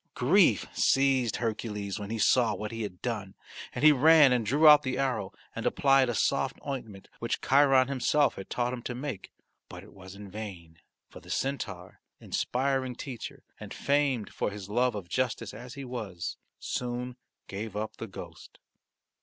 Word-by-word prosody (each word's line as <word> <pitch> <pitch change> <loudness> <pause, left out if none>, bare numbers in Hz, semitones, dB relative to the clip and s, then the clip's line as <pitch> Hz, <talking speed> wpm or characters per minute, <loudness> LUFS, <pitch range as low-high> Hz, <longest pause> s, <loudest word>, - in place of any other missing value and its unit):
Grief - - +4
seized 135 -4 +2
Hercules 105 -3 -3
when 100 -1 -6
he 115 - -3
saw 115 0 +3
what 105 0 -5
he 115 0 -5
had 100 -4 -6
done 105 -6 -4 0.4
and - - -5
he 155 - +9
ran 150 0 +6
and 120 -2 +1
drew 145 +9 +4
out 150 -1 +9
the 130 -3 -3
arrow 125 -8 -1 0.2
and - - -4
applied 135 -2 +3
a 120 - -1
soft - - 0
ointment 115 -8 -6
which 115 - -2
Chiron 135 -2 +4
himself 140 +2 +2
had 95 - -9
taught 125 0 -1
him 125 - -5
to 125 0 -5
make. 130 -5 -6 0.4
But - - -10
it - - -16
was 95 0 -12
in 100 -1 -10
vain, 90 -6 -8 0.3
for - - -12
the - - -16
centaur, 100 -10 -4 0.2
inspiring 130 0 -1
teacher 125 -4 -8 0.2
and - - -9
famed 140 -6 0
for - - -1
his 100 -2 -8
love 120 +2 +1
of 100 -4 -6
justice 115 -1 -2
as 120 +4 -10
he 140 -1 -7
was, 110 -9 -5 0.2
soon 125 0 -4 0.3
gave 105 +1 -6
up 110 +1 -4
the 115 - -6
ghost. 95 - -11
120 Hz, 175 wpm, -29 LUFS, 105-135 Hz, 0.4 s, he